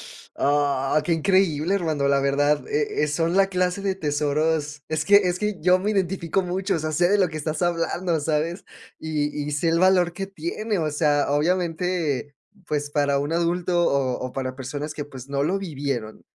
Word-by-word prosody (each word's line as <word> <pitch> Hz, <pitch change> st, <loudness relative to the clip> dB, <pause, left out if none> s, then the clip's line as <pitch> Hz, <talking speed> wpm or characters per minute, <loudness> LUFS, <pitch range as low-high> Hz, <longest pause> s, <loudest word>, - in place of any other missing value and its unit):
Sh -, -, -17 dB
ah, 145 Hz, 0 st, +1 dB
qué 170 Hz, -, +2 dB
increíble, 175 Hz, -1 st, +2 dB
hermano, 155 Hz, -7 st, 0 dB
la 140 Hz, -, +3 dB
verdad, 145 Hz, +2 st, +1 dB
eh 435 Hz, -, 0 dB
eh, -, -, +2 dB
son 165 Hz, +4 st, 0 dB
la 195 Hz, 0 st, +5 dB
clase 180 Hz, 0 st, -1 dB
de 195 Hz, -1 st, -1 dB
tesoros 150 Hz, -1 st, -1 dB
Es 155 Hz, -1 st, -1 dB
que 200 Hz, -, +6 dB
es 180 Hz, -3 st, 0 dB
que 210 Hz, -1 st, -1 dB
yo 180 Hz, +2 st, +4 dB
me 205 Hz, +3 st, -1 dB
identifico 190 Hz, -2 st, 0 dB
mucho, 185 Hz, +3 st, -1 dB
o -, -, -1 dB
sea, 155 Hz, 0 st, -3 dB
sé 175 Hz, +3 st, +3 dB
de 205 Hz, -, +4 dB
lo 185 Hz, -3 st, +2 dB
que 155 Hz, -, -6 dB
estás 155 Hz, 0 st, -3 dB
hablando, 175 Hz, 0 st, 0 dB
¿sabes? 155 Hz, +4 st, -1 dB, 0.3 s
Y 150 Hz, -2 st, -2 dB
y 150 Hz, -, -3 dB
sé 145 Hz, +3 st, 0 dB
el 165 Hz, +1 st, +2 dB
valor 185 Hz, -2 st, +4 dB
que 195 Hz, +2 st, -5 dB
tiene, 195 Hz, +3 st, -3 dB
o 155 Hz, -1 st, -1 dB
sea, 145 Hz, -1 st, +2 dB
obviamente, 165 Hz, -2 st, 0 dB, 0.3 s
pues, 145 Hz, -1 st, -2 dB
para 145 Hz, -1 st, +1 dB
un 145 Hz, +3 st, -3 dB
adulto, 175 Hz, +1 st, +1 dB
o 130 Hz, -3 st, 0 dB
o 130 Hz, 0 st, -5 dB
para 130 Hz, -1 st, -3 dB
personas 145 Hz, +3 st, -5 dB
que, 145 Hz, -, -5 dB
pues, 135 Hz, -2 st, -11 dB
no 140 Hz, 0 st, 0 dB
lo 185 Hz, +6 st, +1 dB
vivieron, 140 Hz, -, -4 dB
160 Hz, 200 wpm, -24 LUFS, 145-180 Hz, 0.3 s, que